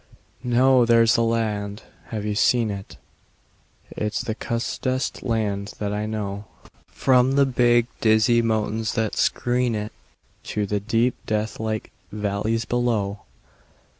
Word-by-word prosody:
No! 125 +1 +4
There's 115 -1 +5
the 115 - +2
land. 110 -3 -1 0.2
(Have 105 -2 -5
you 105 - -1
seen 115 +1 +2
it?) 100 -1 -8 0.9
It's 105 0 -2
the 110 - -3
cussedest 125 +3 -2
land 105 -4 -2
that 105 -1 -3
I 105 +1 -2
know, 105 -1 -4 0.4
From 130 0 +3
the 140 0 +4
big, 120 -2 +3
dizzy 115 +2 +4
mountains 110 -1 -1
that 110 -3 -1
screen 125 -1 +1
it 105 0 -4 0.5
To 105 -1 -2
the 105 +1 -1
deep, 115 +4 +1
deathlike 110 0 -2 0.2
valleys 105 +2 -1
below. 110 -5 0
110 Hz, 125 wpm, -23 LUFS, 105-120 Hz, 0.9 s, There's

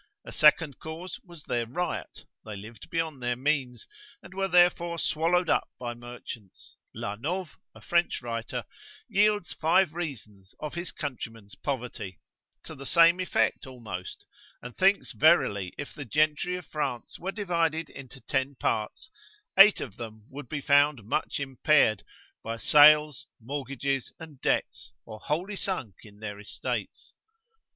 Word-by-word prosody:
A - - -8
second 150 -2 +4
cause 165 +4 -7
was 170 -5 -12
their 120 -1 -1
riot, 175 +9 -4 0.2
they 110 -1 -7
lived 105 +2 -11
beyond 160 -5 -2
their 120 0 0
means, 130 -3 -1 0.4
and - - -12
were 195 0 0
therefore 175 -1 +4
swallowed 165 +4 +1
up - - +2
by 120 -1 -4
merchants. 120 -4 -10 0.2
(La 100 - -4
Nove, 170 - -3 0.3
a - - -14
French 170 0 +1
writer, 115 -1 -4 0.4
yields 205 -3 +2
five 165 +1 +3
reasons 110 - -7
of 150 - -5
his 175 +1 -2
countrymen's 115 -8 -6
poverty, 115 - -5 0.4
to - - -9
the 140 0 -9
same 170 +1 +6
effect 185 -6 0
almost, 110 -8 -7 0.3
and 125 -1 -10
thinks 195 +2 +3
verily 100 - +3
if 145 - -6
the 145 - -7
gentry 155 +6 +1
of 180 -2 -7
France 135 -6 -4
were 190 +2 -3
divided 165 -6 0
into 135 -1 -11
ten 135 +1 -1
parts, 115 - -2 0.4
eight 195 +2 +8
of 110 -7 -7
them 110 -2 -8
would 135 -2 -8
be 145 -2 -3
found 145 -3 +4
much 120 +10 -1
impaired, 135 -5 +3 0.4
by 115 +1 -4
sales, 150 +1 +6
mortgages, 135 +1 -3
and 155 -5 -11
debts, - - -1
or 110 -1 -9
wholly 180 - -2
sunk 185 - -2
in 105 -2 -15
their 105 -1 -6
estates.) 105 - -5
145 Hz, 145 wpm, -28 LUFS, 115-170 Hz, 0.4 s, eight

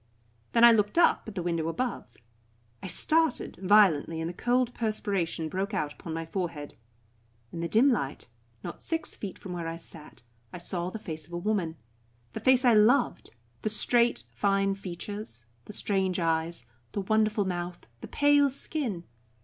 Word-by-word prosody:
Then 235 - +4
I 235 - +10
looked 210 +4 +1
up 340 - +4
at 220 - -8
the 180 - -3
window 165 -2 -1
above. 165 - -4 0.6
I - - -6
started 315 - +2
violently 185 -6 +4
and 160 - -2
the 175 - -5
cold 245 +4 +1
perspiration 200 -7 -1
broke 195 +5 -3
out 150 -3 -2
upon 165 - -9
my 165 0 -3
forehead. 165 -4 -4 0.8
In 170 - -6
the 170 - -1
dim 225 +9 +4
light, 140 - 0 0.4
not - - -7
six 325 -1 -3
feet 200 -3 -7
from 185 - -8
where 170 -2 -4
I 165 0 -4
sat, 155 -7 -10 0.3
I - - -7
saw 175 0 -3
the 205 - -6
face 160 -7 -6
of 175 - -15
a - - -2
woman, 175 -4 -1 0.6
the - - -4
face 260 0 +4
I 240 - +6
loved, 220 +6 +3 0.3
the 215 - -1
straight, 235 - +2
fine 195 +9 +1
features, 195 - -6 0.2
the 210 - -9
strange 190 -3 0
eyes, 165 -4 0 0.3
the 200 - -1
wonderful 215 +1 +1
mouth, 175 -1 -4
the - - -8
pale 290 -1 +4
skin. 255 - -4
195 Hz, 170 wpm, -28 LUFS, 165-220 Hz, 0.8 s, I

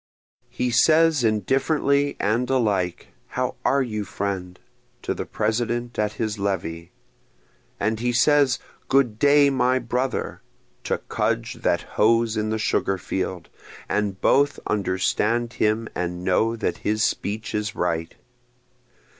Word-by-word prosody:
He 125 0 -2
says 155 +3 +4
indifferently 135 - +1
and 115 +5 0
alike 105 -9 0 0.2
How - - -2
are 140 0 +3
you 110 -4 -3
friend? 95 -2 -4 0.5
to - - -1
the - - -5
President 120 +2 -2
at 105 0 0
his 110 -2 -3
levee, 85 -4 -3 0.9
And 110 +2 0
he 120 +1 0
says 140 +1 +4 0.3
Good 125 -6 +2
day 145 0 +5
my 130 -1 +2
brother, 125 +2 -2 0.4
to - - 0
Cudge - - -1
that - - +1
hoes 115 +1 +2
in 110 0 -1
the 110 - 0
sugar 100 -2 0
field, 95 -1 -4 0.4
And 105 -2 -1
both 140 +1 +3
understand 105 +4 0
him 110 +1 0
and 90 0 -3
know 110 +5 +2
that 115 - -2
his 110 +1 0
speech 105 +2 -2
is 105 -1 -2
right. 80 -2 -2
110 Hz, 130 wpm, -23 LUFS, 100-125 Hz, 0.9 s, day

